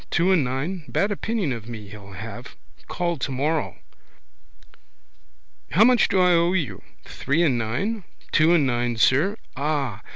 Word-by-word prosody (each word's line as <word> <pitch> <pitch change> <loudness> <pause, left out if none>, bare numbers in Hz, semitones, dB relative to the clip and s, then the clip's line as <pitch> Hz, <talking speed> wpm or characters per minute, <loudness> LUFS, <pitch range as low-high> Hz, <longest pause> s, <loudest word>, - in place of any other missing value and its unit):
Two 175 +2 +2
and 175 -6 +4
nine. 140 +8 -3
Bad 200 +1 0
opinion 205 - -1
of 115 -1 -8
me 110 -4 -8
he'll 100 -1 -11
have. 90 - -9 0.3
Call 170 -1 -2
tomorrow. 145 +4 -2 2.0
How 190 +8 +6
much 245 -1 +5
do 190 - +1
I 180 0 +5
owe 170 +1 +3
you? 135 - -2 0.2
Three 155 +5 0
and 140 -7 +3
nine? 125 - -2 0.3
Two 155 +1 +4
and 155 -4 +3
nine, 120 -2 -1
sir. 150 - +3 0.2
Ah. 140 -7 -2
150 Hz, 150 wpm, -23 LUFS, 120-180 Hz, 2.0 s, How